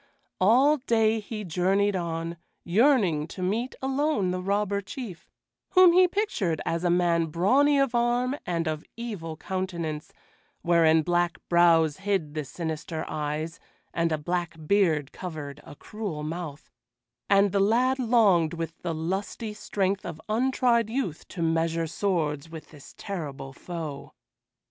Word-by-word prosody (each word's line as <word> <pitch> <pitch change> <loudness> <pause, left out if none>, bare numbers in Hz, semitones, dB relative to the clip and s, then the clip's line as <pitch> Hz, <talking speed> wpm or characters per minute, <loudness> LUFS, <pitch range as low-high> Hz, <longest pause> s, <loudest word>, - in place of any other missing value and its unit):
All 255 +10 +5
day 225 -4 +2
he 215 0 -6
journeyed 195 +3 +1
on, 165 -1 -3 0.3
yearning 190 - +3
to 185 +2 -7
meet 225 +7 -1
alone 270 -7 +1
the 180 0 -2
Robber 200 +1 0
Chief, 200 -3 -8 0.4
whom 370 -2 +7
he 365 +1 +6
pictured 335 - -1
as 165 +1 -1
a 175 - +2
man 170 -1 +2
brawny 260 - +3
of 275 -3 +1
arm 240 +2 +1
and 170 -2 -2
of 155 -1 -2
evil 190 -9 -5
countenance, 170 -5 -4 0.5
wherein 165 -2 +4
black 175 +1 +1
brows 165 -3 +4
hid 190 -7 -1
the 155 -1 -2
sinister 160 +1 -5
eyes, 155 +2 -3 0.3
and 165 -1 0
a 155 - +1
black 175 +2 -2
beard 160 -6 +2
covered 150 -5 -7
a - - -12
cruel 200 -5 -6
mouth; 155 -3 -6 0.6
and 200 0 +4
the 200 - +1
lad 245 +6 +3
longed 205 -10 +3
with 165 0 -5
the 170 -2 -3
lusty 195 +7 -3
strength 200 -2 -1
of 155 - -6
untried 235 0 +2
youth 220 - -3
to 170 - -4
measure 165 0 +1
swords 160 -4 -1
with 160 -1 -10
this 145 -3 -14
terrible 145 -8 -6
foe. 155 -3 -7
180 Hz, 140 wpm, -27 LUFS, 160-215 Hz, 0.6 s, whom